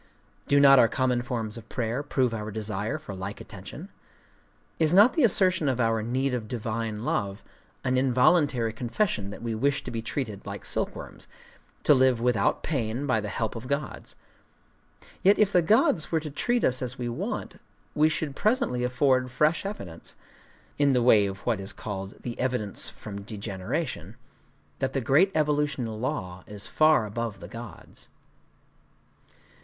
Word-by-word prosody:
Do 140 - +4
not 135 -1 +8
our 115 - +6
common 125 0 0
forms 120 -3 -4
of 115 -1 -11
prayer 120 +1 -2
prove 130 -4 0
our 105 -1 -4
desire 105 +3 -3
for 150 -10 -9
like 95 +2 -6
attention? - - -9 0.9
Is 160 +1 +3
not 210 +6 +7
the 320 - +1
assertion 185 - +4
of 125 -2 -1
our 115 -2 +2
"need 130 +4 -1
of 115 -3 -3
divine 110 -1 -3
love" 100 -4 -2 0.4
an 130 -1 +1
involuntary 130 -2 +3
confession 115 - -1
that 100 - -9
we 115 -1 -2
wish 140 +6 0
to 125 - -6
be 115 -1 -3
treated 110 -3 -4
like - - -7
silkworms,—to - - -2
live 130 -3 +4
without 120 -3 +1
pain 125 -3 -2
by 125 -6 +1
the 105 - -4
help 110 +2 -2
of 115 +2 -7
gods? 140 +2 -4 1.1
Yet 200 +2 +5
if 210 -2 +3
the 180 - +5
gods 170 -3 +3
were 165 - +2
to 155 -1 -7
treat 240 - 0
us 125 +1 +2
as 125 0 -4
we 120 - -3
want, 120 - -4 0.3
we 155 +1 +4
should 155 -3 -3
presently 215 - +1
afford 130 0 +2
fresh 150 +9 +1
evidence,—in 140 - -5
the 125 -2 +2
way 110 -5 +5
of 95 0 -7
what 115 -5 +1
is 95 0 -4
called 95 -2 -6
"the 120 -2 -6
evidence 125 -6 -1
from 100 -2 -8
degeneration,"—that 100 +5 -6
the 135 - +1
great 155 - +4
evolutional 145 -7 0
law 95 -9 -4
is 105 -1 -7
far 155 -6 +4
above 110 -1 -4
the 85 - -9
gods. 115 +3 -11
125 Hz, 160 wpm, -27 LUFS, 110-145 Hz, 1.1 s, not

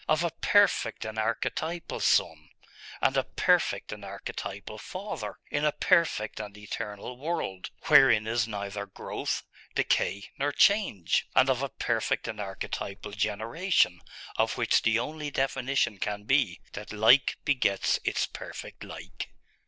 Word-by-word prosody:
of 155 +2 +3
a 170 - 0
perfect 200 - +3
and 110 0 -4
archetypal 160 +9 -2
Son, 75 -2 +2 0.5
and - - +3
a - - +3
perfect - - +1
and - - -7
archetypal - - -6
Father, - - -6 0.2
in 145 - 0
a 150 - +4
perfect 165 -13 +2
and 105 -1 -7
eternal 105 +2 -6
world, 145 - -3
wherein 115 -5 +6
is 115 0 +1
neither 100 -1 -4
growth, 95 - -4 0.3
decay, 100 +1 +1 0.2
nor 145 +1 +1
change; 200 - +3
and 130 +1 +6
of 130 0 0
a 140 - -1
perfect 115 -3 -1
and 110 - -5
archetypal 100 +1 -5
generation, 110 - +1 0.4
of - - +1
which - - +3
the 115 0 +3
only 150 +5 -3
definition 135 -5 0
can 105 0 -3
be, 110 -6 +2
that 105 +1 -7
like 110 +6 +5
begets 125 -9 +2
its - - +1
perfect - - -9
like?.... - - -8
115 Hz, 135 wpm, -28 LUFS, 105-145 Hz, 0.5 s, wherein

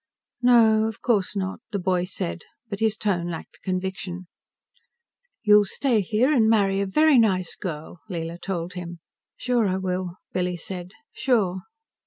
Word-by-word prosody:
"No, 225 -3 +5
of 225 - -6
course 210 -4 +1
not," 190 0 -3
the 205 - -1
boy 180 -1 0
said, 85 - -4 0.3
but 200 - -3
his 220 -1 +1
tone 180 -5 0
lacked 165 -2 -8
conviction. 185 -1 -3 1.2
"You'll 210 -1 +7
stay 235 +2 +1
here 220 - +2
and 225 -5 +4
marry 200 -3 +3
a 200 - -1
very 305 +6 +5
nice 185 -6 +1
girl," 160 -1 -6
Leela 170 -1 -5
told 180 -2 -3
him. 175 -1 -7 0.4
"Sure 245 -4 +1
I 185 0 0
will," 185 -1 -3 0.2
Billy 180 -1 -1
said. 180 +1 -7 0.2
"Sure." 220 -8 +1
190 Hz, 150 wpm, -24 LUFS, 180-220 Hz, 1.2 s, You'll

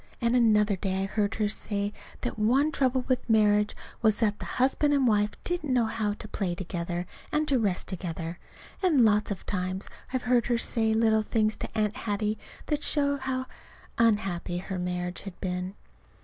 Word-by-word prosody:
And 235 0 +2
another 210 -4 +4
day 190 0 -1
I - - 0
heard 205 +1 -1
her 215 -1 +1
say 205 0 -2 0.3
that 245 -3 -3
one 265 +8 +3
trouble 260 -2 +1
with 255 -2 0
marriage 210 -1 +4 0.3
was 215 -2 +4
that 210 -2 +1
the - - -5
husband 280 +3 +3
and 275 -2 +3
wife 210 -2 +3
didn't 345 -6 -2
know 245 -2 +3
how 220 -2 -1
to - - -9
play 185 -4 -2
together 175 -1 -3 0.3
and 300 0 +1
to 270 -3 +3
rest 200 -5 -1
together. 170 -2 -5 0.4
And 310 - +5
lots 210 -1 +3
of 200 -3 -5
times 185 0 -3 0.2
I've 255 -1 -1
heard 245 -1 +3
her 240 -1 +2
say 225 -1 +1
little 220 -1 +4
things 215 0 +1
to - - -6
Aunt 210 0 +1
Hattie 215 -3 -1 0.3
that 300 -1 -1
showed 285 -1 +1
how 260 -1 -2 0.5
unhappy 195 -6 +1
her 190 +1 -4
marriage 180 0 -3
had 195 -2 -9
been. 180 0 -3
215 Hz, 180 wpm, -28 LUFS, 195-245 Hz, 0.5 s, And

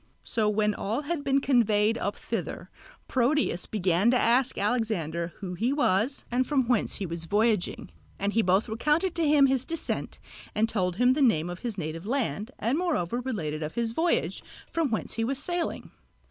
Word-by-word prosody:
So 215 -2 0
when 210 0 +1
all 220 +7 -2
had 295 0 -3
been 275 -1 +2
conveyed 225 -5 +3
up 205 -3 -2
thither, - - -5 0.4
Proteus 260 -5 +1
began 190 0 +2
to 250 - +4
ask 245 +2 +2
Alexander 190 -7 -1
who 185 -2 -4
he 230 +8 0
was 260 -2 +1
and 250 +1 +1
from 270 -5 +1
whence 240 -4 +1
he 200 - -3
was 165 -1 -5
voyaging; 210 +1 0 0.3
and 200 +1 -1
he 225 - +3
both 190 +3 +2
recounted 300 - +1
to 335 -2 +1
him 290 -1 +6
his 265 -2 +2
descent 330 +3 -4 0.4
and 220 +2 +3
told 185 -6 -1
him 245 +5 +4
the 290 - -1
name 175 - +3
of 175 - -7
his 230 -4 -4
native 165 +2 -5
land, 225 - -1
and 240 +9 0
moreover 245 - 0
related 170 - -3
of 155 0 -4
his 235 -1 0
voyage, 330 +8 0 0.3
from 330 -4 0
whence 220 - -2
he 225 - -1
was 265 +4 -1
sailing. 345 +4 -3
225 Hz, 185 wpm, -27 LUFS, 195-270 Hz, 0.4 s, him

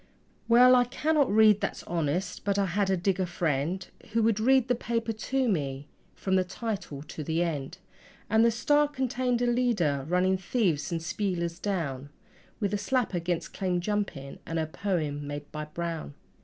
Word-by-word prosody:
Well, 245 +2 +7
I 245 -1 +5
cannot 285 +2 +1
read, 215 -1 +6
that's 200 - -3
honest, 175 +2 -2
but 200 -1 0
I 200 - +2
had 195 +2 0
a 190 - +2
digger 185 +1 0
friend 170 +1 -1 0.3
Who 230 0 +3
would 220 -1 +2
read 260 +2 +4
the 250 - +3
paper 230 -1 -2
to 260 +4 -1
me 145 - -2 0.3
from 190 -1 -1
the 185 - +4
title 190 -7 -5
to 155 0 -7
the 160 +3 0
end; 160 0 -3 0.5
And 220 +2 +4
the 235 - +6
STAR 290 +6 +3
contained 255 -3 -1
a - - +3
leader 230 - +1
running 185 +1 +2
thieves 180 - 0
and 165 -1 -2
spielers 170 -2 -2
down, 145 -9 -3 0.5
With 205 -2 -1
a 205 - 0
slap 250 -1 0
against 175 -1 -2
claim 180 -2 -1
jumping, 175 -8 -3
and 165 - -4
a 160 - +1
poem 155 -4 -2
made 145 0 -6
by 150 0 -5
Brown. 165 -2 -5
190 Hz, 175 wpm, -28 LUFS, 165-230 Hz, 0.5 s, Well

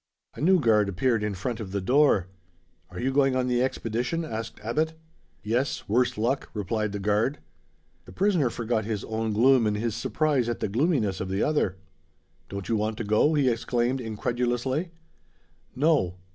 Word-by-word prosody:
A - - -9
new 185 +4 +5
guard 105 -7 +3
appeared 115 +4 +1
in 105 -1 -2
front 115 +5 -4
of 100 -4 -6
the 100 - -1
door. 125 -2 +3 0.6
"Are - - -8
you 130 +2 -1
going 135 -1 +3
on 130 -1 +1
the 125 -1 +1
expedition?" 125 +5 -1
asked 115 -5 -6
Abbot. 155 +8 0 0.5
"Yes, 120 +6 -1
worse 120 +3 +1
luck," 120 +5 -1
replied 105 +1 -1
the 105 - -3
guard. 105 +8 +1 0.7
The - - -12
prisoner 185 -9 +2
forgot 115 -1 -1
his 105 -1 -3
own 110 0 -2
gloom, 120 +2 +4
in 105 - 0
his 110 +1 -1
surprise 145 -4 0
at 120 - -3
the - - -2
gloominess 115 - +1
of 95 - -4
the 95 +2 0
other. 145 -11 +1 0.7
"Don't 100 -1 -6
you 115 - +1
want 110 0 -1
to - - -3
go?" 110 +9 +3
he 140 -3 +2
exclaimed 120 +2 0
incredulously. 120 - -1 0.9
"No." 140 - +2
120 Hz, 170 wpm, -26 LUFS, 105-135 Hz, 0.9 s, new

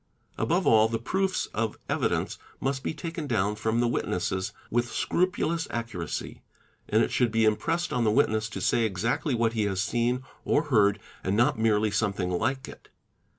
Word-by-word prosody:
Above - - +1
all, 110 -1 +6
the 115 0 -1
proofs 190 +10 0
of 110 0 -1
evidence - - -1 0.2
must 135 0 -1
be - - -2
taken 165 -1 -5
down 105 -5 +1
from 110 +2 0
the 120 - +3
witnesses 95 -4 -1 0.2
with 120 +1 0
scrupulous 170 -2 0
accuracy; 115 -9 -4 0.5
and - - +4
it - - -1
should 120 -3 +2
be 110 0 +3
impressed 165 +11 0
on 125 - +1
the 110 - +3
witness 110 +1 +2
to - - -6
say 120 - +2
exactly 115 - 0
what 115 -1 +1
he 110 -2 +1
has 95 -2 -1
seen 120 +5 0 0.2
or 150 - +2
heard 105 -8 +3 0.2
and 95 +2 0
not 120 +2 +3
merely 110 -1 +2
something 100 -3 0
like 130 +9 -1
it. - - -13
115 Hz, 175 wpm, -27 LUFS, 105-130 Hz, 0.5 s, all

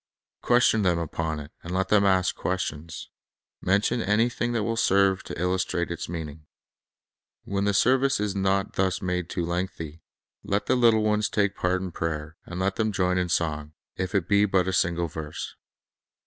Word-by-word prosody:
Question 120 -3 +4
them 90 -3 +2
upon 80 -1 -2
it, 75 +1 -9
and 85 - -8
let 95 0 0
them 105 -1 +4
ask 95 -1 +3
questions. 85 -3 -4 0.5
Mention 100 +5 +1
anything 115 +3 +1
that 115 -3 0
will 115 +1 -1
serve 95 -3 +3
to - - -8
illustrate 90 -1 0
its 85 -1 -5
meaning. 80 -2 -6 1.0
When 100 0 -1
the 100 - +2
service 130 +3 +3
is 105 -1 -1
not 95 0 0
thus 95 -1 0
made 90 -1 -2
too 85 - -2
lengthy, 85 -2 -4 0.4
let 100 +1 -1
the - - +2
little 115 -3 +4
ones 105 -1 +1
take 100 -1 +1
part 90 +1 0
in 95 - -5
prayer, 80 -1 -4
and 90 +1 -6
let 95 +1 0
them 110 -1 +1
join 90 -2 +1
in 90 -1 -1
song, 75 -3 -1 0.2
if 95 +2 -3
it 95 -4 +1
be 100 0 +4
but 95 -2 +2
a 95 - 0
single 85 -1 +1
verse. 75 -1 -6
95 Hz, 175 wpm, -26 LUFS, 85-100 Hz, 1.0 s, Question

